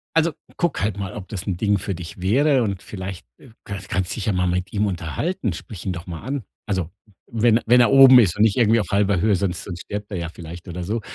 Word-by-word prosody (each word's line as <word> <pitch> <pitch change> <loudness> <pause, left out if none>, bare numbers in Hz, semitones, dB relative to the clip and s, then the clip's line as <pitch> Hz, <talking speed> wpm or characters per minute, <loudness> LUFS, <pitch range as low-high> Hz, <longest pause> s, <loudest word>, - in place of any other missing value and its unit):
Also, 165 -1 +3 0.2
guck 175 - 0
halt 105 0 -1
mal, 100 0 -4
ob 100 -3 -8
das 100 -3 -5
'n 90 -3 -2
Ding 100 0 +2
für 100 0 -3
dich 90 0 -9
wäre 130 +6 +3
und 100 -3 -3
vielleicht, 95 -2 -7
äh, - - -17
kann 100 -1 -6
kannst 95 0 -2
dich 110 - -4
ja 105 - +1
mal 90 0 +1
mit 90 +3 -2
ihm 105 0 +1
unterhalten, 95 - -2
sprich 85 +3 -9
ihn 95 - -1
doch 90 +1 -8
mal 85 -3 -6
an. 135 +1 -4 0.2
Also, 95 -5 -2 0.4
wenn 115 0 +3
wenn 125 +1 +6
er 120 - +5
oben 135 -2 +9
ist 95 -8 +3
und 105 - -1
nicht 110 -3 +3
irgendwie 115 -1 +4
auf 105 - -3
1/2 100 -1 +2
Höhe, 105 -1 +3
sonst 90 -1 -2
sonst 90 -3 -7
stirbt 105 0 -6
er 95 - -3
ja 85 -1 -4
vielleicht 85 +2 -10
oder 90 0 -5
so. 110 +5 -2
100 Hz, 255 wpm, -22 LUFS, 90-115 Hz, 0.4 s, oben